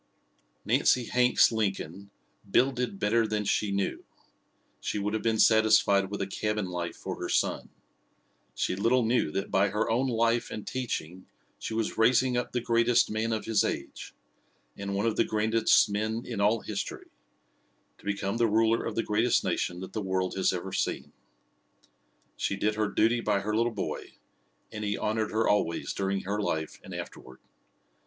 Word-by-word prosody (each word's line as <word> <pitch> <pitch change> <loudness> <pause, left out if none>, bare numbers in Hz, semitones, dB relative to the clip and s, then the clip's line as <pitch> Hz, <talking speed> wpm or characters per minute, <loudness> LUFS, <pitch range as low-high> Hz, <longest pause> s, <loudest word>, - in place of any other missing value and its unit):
Nancy 125 -2 +3
Hanks 125 +1 +4
Lincoln 100 -3 -3 0.4
"builded 125 -2 +1
better 110 +3 +2
than 105 -1 -2
she 100 0 0
knew." 100 0 -2 0.8
She - - -3
would 105 +1 -2
have 110 - -1
been 115 -1 +1
satisfied 110 -3 +4
with 100 0 -3
a - - -1
cabin 105 +1 -2
life 90 -1 -4
for - - -6
her - - -3
son. - - 0 0.9
She - - -1
little 115 +5 +2
knew 115 -7 +2
that 95 +6 -4
by 100 +1 +3
her 105 +3 -1
own 125 +4 +1
life 115 -1 +1
and 110 - -6
teaching 95 -9 -4 0.3
she 110 - -4
was 115 0 -2
raising 125 +2 +4
up 125 - -1
the 125 - -1
greatest 115 0 +3
man 110 +1 -1
of 110 -1 -2
his 110 -1 +2
age, - - -5 0.6
and 100 0 -4
one 100 +3 0
of 115 - 0
the - - +4
grandest 110 +1 +3
men 110 +3 -2
in 115 -5 -4
all 105 +2 +3
history, 100 -2 -5 0.9
to - - -20
become 100 +1 -2
the 115 -1 +3
ruler 115 +2 +2
of 115 - -4
the 115 - 0
greatest 110 +3 +2
nation 90 +1 -2
that 95 - -8
the 110 - -2
world 95 -1 -1
has 95 - +2
ever 95 +1 -5
seen. - - -2 1.2
She 100 - -1
did 105 +2 0
her 105 0 0
duty 115 +4 +2
by 105 -3 +1
her 105 +1 -2
little 115 +2 +2
boy - - -5 0.6
and 105 -1 -6
he 105 0 -1
honored 110 0 -1
her 110 +1 0
always 85 -5 0
during 95 0 -1
her 105 +2 -2
life 80 -5 -3
and - - -11
afterward. 65 +1 -9
105 Hz, 175 wpm, -28 LUFS, 100-115 Hz, 1.2 s, Hanks